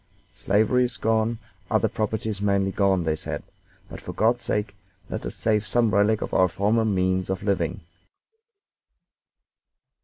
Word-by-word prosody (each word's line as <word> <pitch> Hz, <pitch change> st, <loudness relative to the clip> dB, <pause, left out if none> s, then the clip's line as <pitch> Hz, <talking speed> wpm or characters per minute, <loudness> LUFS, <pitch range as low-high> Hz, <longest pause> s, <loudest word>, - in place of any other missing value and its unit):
"Slavery 110 Hz, +6 st, +2 dB
is 125 Hz, 0 st, -4 dB
gone, 110 Hz, +1 st, +1 dB, 0.3 s
other -, -, +2 dB
property 110 Hz, 0 st, -2 dB
is 105 Hz, -2 st, -3 dB
mainly 100 Hz, -1 st, +1 dB
gone," 95 Hz, -2 st, +2 dB
they 80 Hz, -1 st, 0 dB
said, 80 Hz, -, -5 dB, 0.4 s
"but, -, -, -10 dB
for -, -, -7 dB
God's 115 Hz, +2 st, +2 dB
sake, 105 Hz, -1 st, -2 dB, 0.4 s
let -, -, -4 dB
us -, -, -7 dB
save 110 Hz, -2 st, +1 dB
some 115 Hz, +2 st, +2 dB
relic 105 Hz, +2 st, +3 dB
of -, -, -6 dB
our 95 Hz, -1 st, +4 dB
former 105 Hz, +5 st, +1 dB
means 95 Hz, -3 st, 0 dB
of 95 Hz, 0 st, -2 dB
living." 95 Hz, -5 st, -1 dB
105 Hz, 150 wpm, -25 LUFS, 95-110 Hz, 0.4 s, our